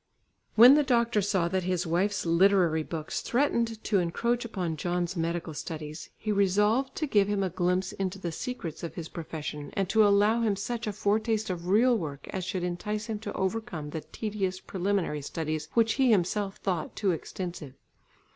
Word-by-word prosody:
When 240 +4 +10
the 300 - +5
doctor 235 -5 +2
saw 190 -3 +1
that 190 +1 0
his 180 -1 -1
wife's 185 +5 0
literary 170 -1 +4
books 155 0 -4
threatened 235 -4 0
to 205 -3 +2
encroach 235 +8 0
upon 185 -8 -3
John's 175 +3 -2
medical 165 -1 -2
studies, 155 0 -6
he 215 - -2
resolved 210 +7 +2
to 310 - -1
give 205 -8 +3
him 205 -1 0
a 185 - -1
glimpse 180 +1 0
into 195 0 -3
the 175 -3 -4
secrets 170 -4 -5
of 170 - -6
his 165 -2 -5
profession, 150 -3 -6
and 195 -1 0
to 220 +1 +5
allow 205 +3 +4
him 215 -3 +2
such 230 +4 -4
a - - 0
foretaste 215 +1 0
of 175 -1 -5
real 235 +6 +4
work 150 -9 -5
as 190 - -3
should 185 0 -3
entice 210 +5 -3
him 220 -2 -4
to 210 -1 -6
overcome 190 -6 -3
the 160 - -4
tedious 195 -3 -3
preliminary 190 -5 -1
studies 155 +1 -3
which 225 -1 +4
he 260 - +5
himself 200 0 +1
thought 180 -5 -3
too 200 -3 +1
extensive. 170 -4 -5
190 Hz, 180 wpm, -28 LUFS, 170-215 Hz, -, When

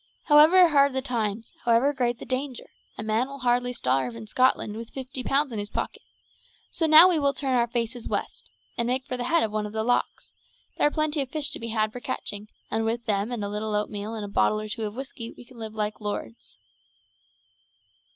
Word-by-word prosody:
However 330 +4 +7
hard 280 -2 +4
the 265 - -1
times, 225 -4 -2
however 240 +5 +3
great 245 -3 0
the - - -9
danger, 255 0 -4 0.3
a - - -4
man 220 +4 +1
will 275 0 -8
hardly 245 -1 +1
starve 130 - -1
in 115 -1 -8
Scotland 235 - +1
with 230 +1 -7
fifty 265 0 -6
pounds 275 +1 +1
in 220 - -3
his 205 0 -5
pocket; - - -4 0.7
so 325 - 0
now 315 +3 +10
we 350 -4 +2
will 280 -1 +1
turn 270 -2 0
our 240 -1 +3
faces 235 0 -3
west, - - -4 0.3
and 235 - +1
make 255 +2 -1
for 255 - -4
the 245 -1 -3
head 335 +6 +3
of 220 - -1
one 210 0 -2
of 210 - -10
the 220 0 -1
lochs; 245 +2 -1 0.4
there - - +3
are - - +2
plenty 310 -1 0
of 270 - -4
fish 300 0 -1
to - - -5
be 230 - -5
had 215 -1 0
for 245 - -6
catching, 210 -2 -4 0.2
and 225 - 0
with 230 +1 -2
them 205 +2 0
and 235 -4 -3
a - - -2
little 210 +1 -3
oatmeal 210 +1 -3
and 215 -2 -4
a - - -6
bottle 210 +1 +2
or 215 - -5
two 215 +1 -3
of 210 0 -5
whiskey 260 -3 -7
we 245 - -12
can 240 -1 -16
live 220 -1 -7
like 210 0 -3
lords." 160 - -6
235 Hz, 225 wpm, -26 LUFS, 215-270 Hz, 0.7 s, now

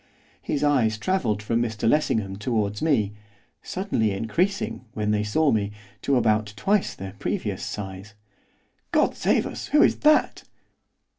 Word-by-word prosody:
His 145 -1 -2
eyes 125 -7 +2
travelled 110 - 0
from 115 +2 0
Mr 110 -2 -1
Lessingham 110 -8 +1
towards 105 -2 -1
me, 115 -11 +1 0.5
suddenly 185 - -1
increasing, 165 - -1
when 105 -1 -1
they 105 0 +1
saw 140 +9 +2
me, 105 -2 0 0.3
to 140 - +1
about 110 -3 +2
twice 195 - +1
their 95 0 -7
previous - - -2
size. 100 +1 -6 0.8
'God - - +3
save - - +1
us! - - -6
who 300 +2 +5
is - - +3
that? 305 0 +3
110 Hz, 140 wpm, -25 LUFS, 105-150 Hz, 0.8 s, who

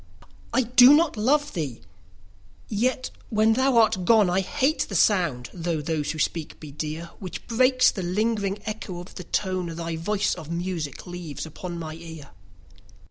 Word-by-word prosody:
I 260 - +2
do 250 +4 +7
not 320 -2 +2
love 285 +7 +1
thee!—yet, 100 - -5 0.2
when 220 0 +3
thou 260 +1 +2
art 220 -5 +4
gone, 210 -1 +4
I 185 - +2
hate 280 +9 0
the 195 - -5
sound 170 - +2
(though 170 -2 -2
those 150 0 -2
who 155 - -3
speak 155 0 -2
be 150 -2 -9
dear) 155 +2 -4
10 170 - -9
Which 185 -3 -7
breaks 255 +2 +4
the 195 - -5
lingering 200 +2 0
echo 210 -4 -5
of 175 +2 -10
the 180 - -8
tone 185 -2 -1
Thy 165 -1 -4
voice 205 +5 0
of 160 -3 -9
music 170 -4 -4
leaves 175 -5 -6
upon 170 +2 -7
my 160 -2 -6
ear. 160 -3 -10
180 Hz, 165 wpm, -25 LUFS, 160-220 Hz, 0.2 s, do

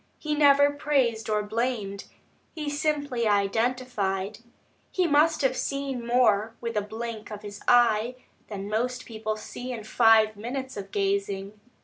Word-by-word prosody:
He 305 -1 -3
never 285 -1 +5
praised 265 -7 0
or 210 -1 +1
blamed, 215 -2 -2 0.5
he 300 -2 -3
simply 290 -5 -1
identified. 210 -1 0 0.5
He 370 - +1
must 310 0 +3
have 260 -1 +2
seen 275 -3 -3
more 225 -3 +3
with 230 -1 -4
a 210 - +2
blink 220 +1 -6
of 210 -1 -8
his 205 -1 -8
eye, 240 0 +4 0.3
than 200 -2 -6
most 245 +4 -2
people 220 -1 -4
see 245 +4 -7
in 230 -3 -5
five 220 -1 +4
minutes 260 +5 -5
of 195 -1 -7
gazing. 200 0 -1
230 Hz, 140 wpm, -26 LUFS, 210-260 Hz, 0.5 s, never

